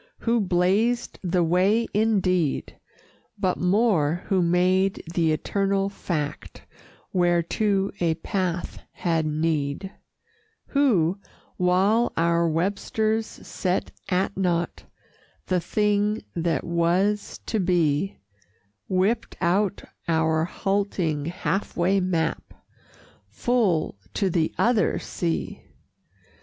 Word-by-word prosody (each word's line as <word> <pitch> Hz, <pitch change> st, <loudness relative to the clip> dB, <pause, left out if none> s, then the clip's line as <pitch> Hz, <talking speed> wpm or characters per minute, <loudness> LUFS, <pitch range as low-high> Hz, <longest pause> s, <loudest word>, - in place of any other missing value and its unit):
Who 235 Hz, 0 st, +2 dB
blazed 200 Hz, +6 st, +1 dB
the 180 Hz, -1 st, +1 dB
way, 190 Hz, +7 st, +3 dB
indeed, 185 Hz, -7 st, +1 dB, 0.6 s
But 185 Hz, -1 st, 0 dB
more 180 Hz, -4 st, +2 dB
who 190 Hz, -3 st, +3 dB
made 185 Hz, +3 st, +2 dB
the 165 Hz, -3 st, +2 dB
eternal 195 Hz, +4 st, 0 dB
Fact 150 Hz, -, -4 dB, 0.5 s
Whereto 185 Hz, +3 st, +1 dB
a 165 Hz, -2 st, +1 dB
path 175 Hz, +1 st, -3 dB
had 165 Hz, -3 st, 0 dB
need; 155 Hz, +3 st, -1 dB, 0.8 s
Who, 200 Hz, -, +2 dB, 0.4 s
while 190 Hz, +6 st, +2 dB
our 170 Hz, 0 st, +2 dB
Websters 215 Hz, +6 st, 0 dB
set 185 Hz, 0 st, -3 dB, 0.2 s
at 190 Hz, +1 st, 0 dB
naught 175 Hz, -3 st, -1 dB, 0.6 s
The 185 Hz, -1 st, +1 dB
thing 210 Hz, +3 st, +1 dB
that 170 Hz, -1 st, 0 dB
Was 180 Hz, +5 st, 0 dB
to 220 Hz, -, -1 dB
Be, 175 Hz, -1 st, +1 dB, 0.7 s
Whipped 190 Hz, +5 st, 0 dB
out 190 Hz, +3 st, +1 dB, 0.2 s
our 160 Hz, -1 st, +2 dB
halting, 180 Hz, -6 st, -1 dB
half 185 Hz, +3 st, -2 dB
way 185 Hz, +3 st, +3 dB
map 175 Hz, -3 st, -2 dB, 0.7 s
Full 185 Hz, -, 0 dB, 0.2 s
to 195 Hz, -3 st, +1 dB
the 165 Hz, -2 st, +1 dB
Other 225 Hz, -6 st, +2 dB
Sea! 170 Hz, -2 st, -3 dB
180 Hz, 95 wpm, -25 LUFS, 170-200 Hz, 0.8 s, way